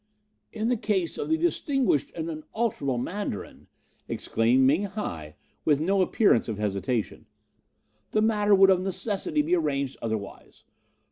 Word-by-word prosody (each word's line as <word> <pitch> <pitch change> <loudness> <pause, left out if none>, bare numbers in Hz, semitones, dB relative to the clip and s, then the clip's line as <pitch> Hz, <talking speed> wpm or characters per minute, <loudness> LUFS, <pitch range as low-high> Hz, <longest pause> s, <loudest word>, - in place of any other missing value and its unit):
"'In 220 0 -2
the 245 0 +1
case 195 -6 -1
of - - -3
the 320 - +3
distinguished 275 - +1
and 160 -1 -4
unalterable 155 - -2
Mandarin,' 165 - -5 0.4
exclaimed 120 +4 +2
Ming 155 +10 +3
hi, 80 - -6 0.3
with 145 -2 +3
no 190 +5 +2
appearance 185 - +3
of 110 - -3
hesitation, 105 +2 -2 0.8
'the 215 - +1
matter 210 -2 +3
would 195 0 +6
of 185 -1 +3
necessity 205 - -1
be 340 +4 +2
arranged 140 - -1
otherwise. 110 -3 -6
185 Hz, 135 wpm, -26 LUFS, 130-215 Hz, 0.8 s, would